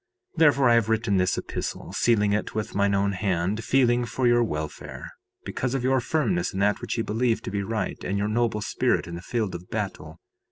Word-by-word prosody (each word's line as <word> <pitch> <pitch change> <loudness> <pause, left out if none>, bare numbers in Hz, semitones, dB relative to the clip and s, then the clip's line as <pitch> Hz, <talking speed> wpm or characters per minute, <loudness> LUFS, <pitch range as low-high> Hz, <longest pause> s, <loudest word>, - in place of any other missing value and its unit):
3:5 - - -29
Therefore 140 -5 +5
I - - +6
have 115 -2 +3
written 110 -3 +1
this 90 0 +1
epistle, - - -5
sealing 105 -3 +2
it 105 - -2
with 110 -2 -3
mine 100 0 +2
own 100 +1 +1
hand, 95 +2 -1
feeling 125 -2 +3
for 125 +3 -2
your 120 0 +5
welfare, 75 -8 -5 0.3
because 125 0 -2
of 130 - -1
your 130 0 +2
firmness 160 - 0
in 95 - -3
that 105 +1 +2
which - - -3
ye 115 - 0
believe 115 +2 0
to - - -5
be 100 0 -1
right, 110 +2 -3
and 100 +2 -1
your 100 +1 0
noble 110 -1 0
spirit - - 0
in 85 - -8
the 85 - -6
field 110 0 -2
of 85 +1 -8
battle. 90 -7 -5
110 Hz, 215 wpm, -25 LUFS, 100-120 Hz, 0.3 s, I